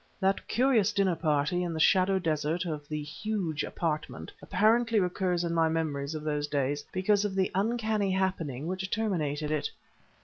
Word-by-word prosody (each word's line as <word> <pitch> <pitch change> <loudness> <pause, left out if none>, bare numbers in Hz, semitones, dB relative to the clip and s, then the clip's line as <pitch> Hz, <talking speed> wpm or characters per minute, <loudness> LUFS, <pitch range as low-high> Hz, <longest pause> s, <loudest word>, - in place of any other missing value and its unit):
That 195 0 0
curious 240 -4 +3
dinner 195 -3 +2
party 155 +1 +1
in 175 -2 -2
the 160 - -3
shadow 190 +4 +4
desert 160 0 -1
of 150 -3 -4
the 150 -1 -3
huge 165 -1 -3
apartment 150 - -3
frequently 225 +1 +2
recurs 180 -1 0
in 170 -1 -1
my 165 -1 +3
memories 155 -2 -2
of 155 - -5
those 150 -1 -1
days 145 0 -1
because 200 +2 +2
of 205 -2 -2
the 190 -1 +1
uncanny 215 0 0
happening 180 -8 -1
which 185 +2 -3
terminated 155 -9 -1
it. 155 -2 0
175 Hz, 165 wpm, -29 LUFS, 150-195 Hz, -, shadow